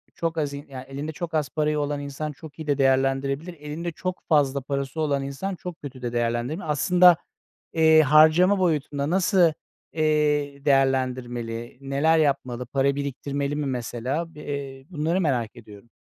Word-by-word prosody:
çok 165 -1 -2
az 145 -2 -1
in 140 +1 -7
yani, 130 -1 -8
elinde 140 +3 -5
çok 170 +1 -6
az 150 -4 0
parayı 150 -1 0
olan 145 0 -1
insan 145 +2 -5
çok 150 +1 -13
iyi 155 - -7
de 145 - +1
değerlendirebilir. 135 +4 +1
Elinde 160 +2 -5
çok 185 +3 -5
fazla 140 -3 +3
parası 140 +2 -3
olan 140 -3 0
insan 140 +8 -4
çok 180 -1 -8
kötü 135 -3 -9
de 120 -1 -4
değerlendirebilir. 120 +8 -1
Aslında, 175 +3 +5 0.6
eee, 160 -1 +6
harcama 155 +6 +5
boyutunda 150 -5 0
nasıl, 180 -2 +3 0.4
eee, 150 -2 +1
değerlendirmeli, 125 -4 0
neler 140 +4 +2
yapmalı, 135 -5 0
para 135 +2 +1
biriktirmeli 140 +1 -3
mi 150 - -2
mesela? 130 +5 -3
Bi - - -11
eee, 140 -2 -6
bunları 170 +2 0
merak 125 -8 -1
ediyorum. 110 0 -14
145 Hz, 155 wpm, -25 LUFS, 135-155 Hz, 0.6 s, eee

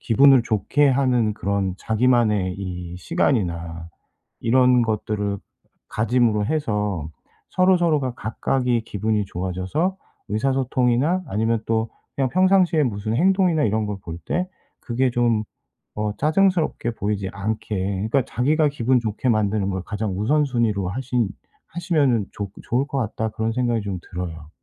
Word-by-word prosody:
기분을 135 +2 +5
좋게 130 +7 +2
하는 125 -5 +2
그런 100 -2 -1
자기만의 110 -5 +2
이 90 -2 -6
시간이나 85 - -1 0.5
이런 125 +1 +4
것들을 105 -2 -1 0.5
가짐으로 115 -2 +1
해서 105 - -1 0.4
서로서로가 170 -8 +2
각각이 120 +2 -1
기분이 105 -1 -1
좋아져서 95 - -2 0.3
의사소통이나 130 - +1
아니면 110 +2 0
또 110 0 0 0.3
그냥 135 -2 +1
평상시에 185 -3 +4
무슨 110 -2 -2
행동이나 185 -1 +3
이런 110 0 +1
걸 105 -1 -4
볼 85 0 -7
때 180 - -1 0.3
그게 125 +2 0
좀 120 -3 +1 0.5
어 105 0 -2
짜증스럽게 160 -5 +1
보이지 100 -3 -2
않게 105 0 -3 0.3
그니까 135 +3 +2
자기가 150 +5 +2
기분 130 -2 +2
좋게 115 +2 -2
만드는 105 -2 +1
걸 95 -1 -3
가장 105 -3 -3
우선순위로 115 -6 +1
하신 120 0 -1 0.4
하시면은 145 - +1
좋 100 -2 -5
좋을 130 +4 0
것 145 - -5
같다 110 -2 -2
그런 110 +1 -2
생각이 120 -2 0
좀 100 -2 -4
들어요. 80 -3 -6
115 Hz, 310 characters per minute, -22 LUFS, 105-135 Hz, 0.5 s, 기분을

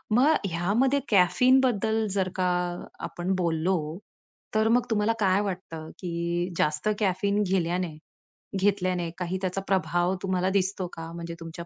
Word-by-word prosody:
मग 280 +6 +5
ह्यामध्ये 205 +11 +1
कॅफीनबद्दल 220 +2 +3
जर 190 -1 0
का 185 - 0 0.6
आपण 180 +2 -2
बोललो, 165 -2 0 0.6
तर 220 0 +3
मग 245 0 +2
तुम्हाला 220 0 +2
काय 195 -1 +3
वाटतं, 180 -5 -5
की 170 0 -2
जास्त 150 +5 0
कॅफीन 200 +1 +1
घेल्याने 180 -3 -1 0.6
घेतल्याने 185 -3 +1
काही 185 0 -2
त्याचा 190 0 -1
प्रभाव 180 -1 +1
तुम्हाला 185 0 +1
दिसतो 190 -1 0
का? 165 0 -7
म्हणजे 170 0 -6
तुमच्या 165 +1 -8
185 Hz, 130 wpm, -27 LUFS, 170-205 Hz, 0.6 s, मग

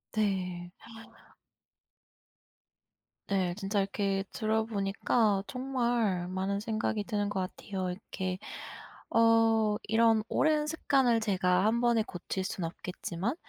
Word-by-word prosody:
네. 180 -4 -1 2.6
네. 185 -3 +1
진짜 200 0 -1
이렇게 195 0 0
들어보니까 215 -1 +1
정말 240 -8 0
많은 190 +2 -1
생각이 215 -1 -1
드는 205 -1 -1
것 200 - -2 0.2
같아요. 190 -3 -4
이렇게 185 0 -4 0.7
어 225 -2 +4
이런 225 0 +3
오랜 305 0 +2
습관을 270 -6 +2
제가 185 -3 +2
1 225 +2 +3
번에 235 -2 +3
고칠 190 -1 -4
수는 185 -2 -3
없겠지만 180 - -4
205 Hz, 215 characters per minute, -30 LUFS, 190-225 Hz, 2.6 s, 어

